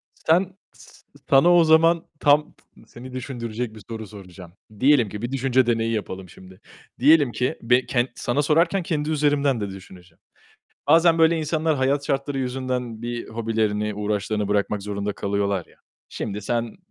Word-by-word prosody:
Sen, 185 +4 +1 0.2
s - - -19 0.2
sana 165 +6 +6
o 170 - +6
zaman 165 +1 +4
tam 150 +1 +3 0.3
seni 125 +2 -11
düşündürecek 120 -3 -5
bir 110 - -12
soru 110 -2 -6
soracağım. 90 -4 -12 0.3
Diyelim 130 -6 +4
ki 105 +1 -7
bir 120 +2 -4
düşünce 130 -1 +2
deneyi 115 -1 0
yapalım 95 -4 -5
şimdi. 95 +3 -16 0.4
Diyelim 145 -1 +5
ki 125 +7 -2
be 125 +2 +2
ken 120 0 0
sana 130 +4 -1
sorarken 165 +5 +2
kendi 155 -2 -2
üzerimden 145 -5 +1
de 100 - -3
düşüneceğim. 90 -2 -13 0.7
Bazen 165 +2 +5
böyle 165 0 +4
insanlar 155 0 0
hayat 140 +2 0
şartları 140 0 -2
yüzünden 125 -3 -3
bir 120 0 -5
hobilerini, 110 -2 -1
uğraşlarını 105 0 -2
bırakmak 105 0 0
zorunda 100 0 -3
kalıyorlar 100 -2 -2
ya. - - -24 0.3
Şimdi 105 0 -5
sen 115 +2 -2
120 Hz, 155 wpm, -23 LUFS, 105-145 Hz, 0.7 s, sana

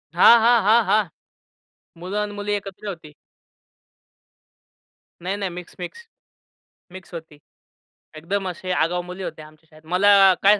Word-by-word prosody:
हां, 235 0 +7
हां, 235 0 +4
हां, 225 +2 +5
हां. 210 -1 +3 0.9
मुलं 185 +4 -5
आणि 210 0 -3
मुली 205 0 -4
एकत्र 200 0 -6
होती. 165 -6 -8 2.1
नाही-नाही, 195 +1 -3
मिक्स 175 0 -10
मिक्स, 465 - -8 0.9
मिक्स 185 -1 -12
होती. 160 -3 -9 0.8
एकदम 190 +4 -3
असे 185 +1 -6
आगाऊ 175 +1 0
मुली 180 +1 -8
होत्या 155 -2 -7
आमच्या 155 +1 -22
शाळेत. 155 0 -20
मला 195 +1 +6
काय 205 +1 +5
190 Hz, 130 wpm, -22 LUFS, 170-205 Hz, 2.1 s, हां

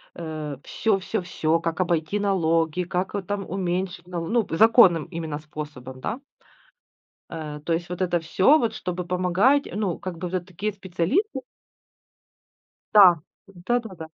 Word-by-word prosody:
э, 155 -4 -5
всё 210 -3 0
всё 205 +1 -2
всё: 165 -1 0
как 165 +1 -2
обойти 170 +2 0
налоги, 165 -3 +1
как 180 +2 -3
там 205 -2 -3
уменьшить 180 -1 -3
налоги, 170 -2 -4
ну, 230 -4 +2
законным 195 -7 +6
именно 160 -4 -5
способом, 150 -4 -8
да. 235 - -4 1.1
Э, 150 -2 -6
то 170 - -1
есть 170 +1 -1
вот 180 +1 -4
это 175 -2 +1
всё, 190 - +4
вот 230 -2 -1
чтобы 180 0 -4
помогать. 185 +10 +3
Ну 200 -4 -2
как 185 -4 -6
бы 180 +1 -4
вот 185 - -7
это 180 -1 -2
такие 205 +4 -3
специалисты 200 - -1 1.5
Да, 185 -5 +9 0.3
да-да-да, 195 -2 -3
180 Hz, 145 wpm, -24 LUFS, 165-195 Hz, 1.5 s, Да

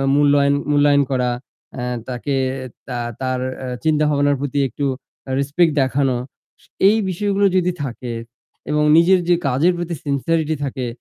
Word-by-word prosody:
মূল্যায়ন 145 -1 +4 0.2
মূল্যায়ন 145 -1 +4
করা 125 -2 +1 0.5
আ - - -3 0.3
তাকে 130 +2 -2 0.5
তা 125 -2 -3 0.2
তার 130 -1 -1 0.2
আ - - -4 0.2
চিন্তাভাবনার 150 -2 +2
প্রতি 145 0 -2
একটু 140 +4 -4 0.4
আ - - -5
respect 150 +4 +2
দেখানো 130 -1 +1 0.7
এই 210 - +5
স - - -2
বিষয়গুলো 200 +2 +1
যদি 180 -1 +2
থাকে 125 -2 -5 0.6
এবং 150 0 +2
নিজের 180 +3 +5
যে 175 - +5
কাজের 140 +8 +3
প্রতি 175 0 -3
sincerity 155 +2 0
থাকে 130 -2 -3
145 Hz, 140 wpm, -20 LUFS, 135-165 Hz, 0.7 s, এই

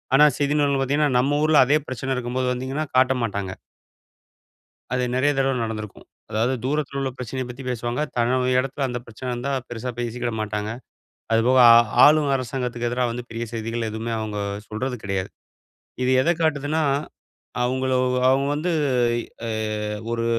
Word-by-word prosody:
ஆனா 150 - +7
செய்தி 145 0 +1
நூல்ல 140 -1 +2
பாத்தீங்கன்னா, 145 +2 +2
நம்ம 145 +3 +2
ஊருல 155 -3 +6
அதே 145 +4 +4
பிரச்சன 130 +1 -3
இருக்கும்போது 125 +1 -1
வந்தீங்கன்னா 135 +5 -3
காட்ட 130 0 +5
மாட்டாங்க. 100 -3 -3 1.4
அது 125 0 +1
நெறைய 145 +3 +3
தடவ 135 0 +2
நடந்திருக்கும். 110 -2 -6 0.2
அதாவது 115 +5 +1
தூரத்துல 140 -1 -1
உள்ள 135 -1 -1
பிரச்சனைய 130 +1 -4
பத்தி 130 +2 -8
பேசுவாங்க. 120 +3 -2 0.2
தன்னோட 125 +2 +2
எடத்துல 135 +1 -2
அந்த 125 0 -3
பிரச்சன 120 +3 -7
இருந்தா 125 +3 -3 0.2
பெருசா 120 +1 -5
பேசிக்கிட 120 0 -2
மாட்டாங்க. 105 0 -3 0.6
அதுபோக 120 +3 +4
ஆ - - +10 0.3
ஆளும் 150 -1 +5
அரசாங்கத்துக்கு 125 -2 -3
எதிரா 125 +1 0
வந்து 120 +1 -5
பெரிய 115 0 -4
செய்திகள் 115 0 -3
எதுமே 110 +2 -4
அவங்க 105 -1 -4 0.3
சொல்றது 125 +4 -3
கிடையாது. 95 -1 -2 0.7
இது 125 - +2
எத 170 - +2
காட்டுதுன்னா? 155 0 +1 0.8
அவங்கள 130 +1 0 0.4
அவங்க 135 +1 +3
வந்து 165 +4 -1 0.5
எ - - -1 0.3
எ - - -2 0.6
ஒரு 115 0 -1
125 Hz, 150 wpm, -23 LUFS, 115-135 Hz, 1.4 s, ஆ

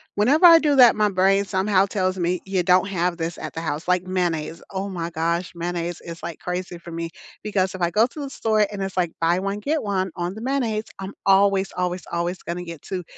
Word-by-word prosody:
Whenever 275 - +4
I 335 -1 +10
do 295 -2 +2
that, 245 -3 +8
my 210 -1 +2
brain 195 +1 +3
somehow 195 0 +2
tells 190 -1 -1
me 175 0 -1
you 190 -2 0
don't 185 +2 +4
have 180 -2 -1
this 165 0 -3
at - - -7
the 165 - -5
house, 155 -1 -3
like, 180 0 +2
mayonnaise. 170 -3 -2
Oh 195 +1 -3
my 170 -3 -4
gosh. 170 +2 -1
Mayonnaise 175 0 -3
is, 170 0 -8
like, 165 - -6
crazy 180 0 -4
for 170 0 -11
me 165 0 -4 0.3
because 190 -3 0
if 185 - -8
I 170 - +2
go 220 +6 +4
to 295 - -9
the 280 - -5
store 215 -4 +1
and 200 -2 -5
it's, 195 -1 -4
like, 175 -3 0
buy 170 +2 +2
one, 195 +2 -3
get 295 +7 -1
one 190 -3 -1
on 175 +1 -3
the 215 - -9
mayonnaise, 235 -4 -1
I'm 195 +1 -6
always, 195 -1 +4
always, 180 0 -2
always 170 +2 -2
going 170 +1 -6
to 180 - -5
get 170 -4 -9
2. 185 -2 -5
185 Hz, 235 wpm, -23 LUFS, 175-200 Hz, 0.3 s, I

